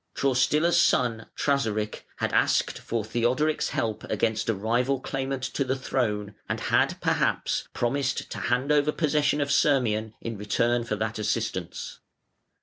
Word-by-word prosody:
Traustila's 140 +5 +3
son, 115 -3 +2
Trasaric, 110 -7 0
had - - -2
asked - - +2
for 115 -2 -3
Theodoric's 125 +7 +1
help 110 -1 -2
against 110 0 0
a 115 - +2
rival 120 +6 0
claimant 135 0 -3
to 140 - -1
the 130 0 -1
throne, 105 -6 -1 0.2
and - - -1
had, - - +1
perhaps, - - 0
promised 135 +2 -1
to - - -4
hand 125 +4 0
over 150 0 +3
possession 150 -2 +1
of 140 0 0
Sirmium 110 -7 +2
in 115 -3 -5
return 115 +4 +1
for 110 - -1
that 110 +1 -3
assistance. 105 -5 -3
120 Hz, 145 wpm, -26 LUFS, 110-140 Hz, 0.2 s, Traustila's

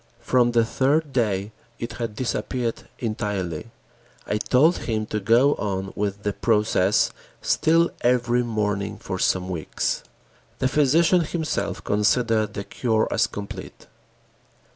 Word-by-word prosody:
From 120 -2 +2
the 115 -1 +4
third 140 +5 +1
day 105 -5 0 0.3
it 115 0 -5
had 115 -2 -3
disappeared 125 0 -2
entirely. 105 -5 -3 0.6
I 105 - -1
told 145 - +3
him 110 -2 -2
to 105 0 -2
go 120 +8 +4
on 95 -2 -3
with 100 0 -2
the 105 - -1
process 105 -3 +2 0.3
still 165 +1 +3
every 120 0 +2
morning 105 -3 -2
for 95 -1 -5
some 90 0 +1
weeks. 85 -5 -2 0.6
The 130 - +1
physician 160 +6 +4
himself 160 0 -2
considered 110 0 +1
the 100 - -3
cure 110 0 0
as 120 +1 +2
complete. 100 -3 -8
115 Hz, 125 wpm, -24 LUFS, 105-125 Hz, 0.6 s, the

